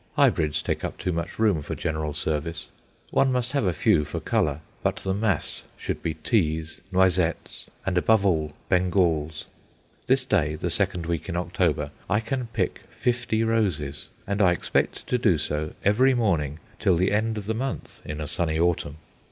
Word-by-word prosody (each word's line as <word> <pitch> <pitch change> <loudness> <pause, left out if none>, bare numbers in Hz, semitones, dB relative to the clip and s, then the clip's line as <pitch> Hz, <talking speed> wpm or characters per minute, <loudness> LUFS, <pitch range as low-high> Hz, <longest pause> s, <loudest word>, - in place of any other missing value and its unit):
Hybrids 75 -2 +3
take - - -2
up - - -3
too 90 - -2
much 85 0 -3
room 105 -8 +3
for - - -4
general 80 -2 -2
service. 80 +2 -2 0.4
One 135 - +3
must 125 0 0
have 140 -6 +1
a 90 - +3
few 75 -2 +3
for - - -4
colour; 75 0 0 0.2
but - - +1
the 95 - -2
mass 100 -4 0 0.2
should - - -4
be 80 -2 -2
Teas, 80 -4 0
Noisettes, 90 -2 +1 0.2
and, 90 -2 +2
above 110 +2 +3
all, 80 -5 +1
Bengals. 85 -4 +1 0.6
This - - +3
day, 75 +1 +1
the 85 +2 -2
second 90 -2 0
week 85 +2 -2
in 85 - -2
October, 85 -1 0 0.2
I 105 +1 +3
can 120 +2 -3
pick 110 -5 -2
fifty 120 -2 0
roses; 90 -11 0 0.2
and 100 +1 -1
I 90 -2 +6
expect - - -1
to 125 - 0
do 100 -9 +4
so 75 +1 -2
every 125 +7 +5
morning 80 - +1 0.2
till 95 - +3
the 95 +3 +2
end 110 +1 +1
of 105 - -5
the 110 - -1
month 130 +4 -4
in 75 0 -5
a 75 - -3
sunny 80 +1 0
autumn. 85 -4 +1
90 Hz, 175 wpm, -26 LUFS, 80-110 Hz, 0.6 s, I